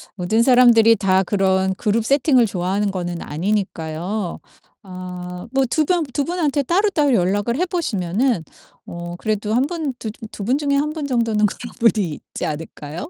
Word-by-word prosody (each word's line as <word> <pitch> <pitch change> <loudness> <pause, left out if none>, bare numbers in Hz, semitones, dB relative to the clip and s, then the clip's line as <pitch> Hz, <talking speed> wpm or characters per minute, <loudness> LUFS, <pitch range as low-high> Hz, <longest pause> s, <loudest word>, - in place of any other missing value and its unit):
모든 215 +5 +1
사람들이 235 -3 +6
다 190 -1 +2
그런 190 -1 +1
그룹 220 +2 0
세팅을 270 -2 +4
좋아하는 195 +1 -1
거는 175 -2 -4
아니니까요. 180 +1 -3 0.4
아 180 -1 -8 0.2
뭐 270 -1 +3
2 310 - +2
병 350 -1 +1
2 285 - 0
분한테 310 -5 0
따로따로 340 -3 +2
연락을 205 +5 +1
해 360 - +1
보시면은 230 - -1 0.4
어 175 0 -7
그래도 215 0 -1
1 255 +3 +3
분 315 -5 -3
두 220 - -4 0.2
두 205 - -7
분 250 +7 +1
중에 285 -1 0
1 300 +2 +1
분 310 -2 -4
정도는 230 -4 +1
그런 235 +3 -8
분이 215 -7 +2 0.2
있지 - - -3
않을까요? 155 - -6
215 Hz, 305 characters per minute, -20 LUFS, 185-270 Hz, 0.4 s, 사람들이